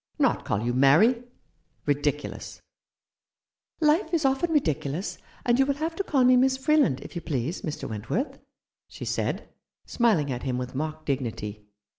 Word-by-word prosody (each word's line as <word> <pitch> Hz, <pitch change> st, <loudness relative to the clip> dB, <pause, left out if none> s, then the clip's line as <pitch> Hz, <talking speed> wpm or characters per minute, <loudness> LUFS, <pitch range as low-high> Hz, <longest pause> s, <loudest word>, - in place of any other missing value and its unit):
Not -, -, +2 dB
call 100 Hz, +2 st, -1 dB
you 120 Hz, +1 st, 0 dB
Mary? 155 Hz, -, +5 dB, 0.6 s
Ridiculous! -, -, -2 dB, 0.5 s
" -, -, -66 dB
" -, -, -56 dB
Life 315 Hz, +2 st, +3 dB
is 315 Hz, -3 st, 0 dB
often 270 Hz, +5 st, +1 dB
ridiculous; 165 Hz, -, -1 dB, 0.3 s
and 240 Hz, +1 st, +3 dB
you 270 Hz, -, +5 dB
will 280 Hz, -, +1 dB
have 320 Hz, +3 st, -3 dB
to 395 Hz, -, -1 dB
call 275 Hz, -8 st, +2 dB
me 250 Hz, 0 st, +6 dB
Miss 260 Hz, +1 st, +3 dB
Freeland, 270 Hz, -, +2 dB
if -, -, -10 dB
you 170 Hz, -, -3 dB
please, 145 Hz, +3 st, -2 dB
Mr. 155 Hz, -6 st, -4 dB
Went 110 Hz, 0 st, -7 dB
worth," 255 Hz, +9 st, -1 dB, 0.5 s
she -, -, -8 dB
said, -, -, -2 dB, 0.4 s
smiling 200 Hz, -, +2 dB
at 125 Hz, -1 st, -3 dB
him 130 Hz, -2 st, -2 dB
with 125 Hz, 0 st, -4 dB
mock 155 Hz, +3 st, -4 dB
dignity. 110 Hz, -6 st, -3 dB
175 Hz, 170 wpm, -26 LUFS, -, 0.6 s, me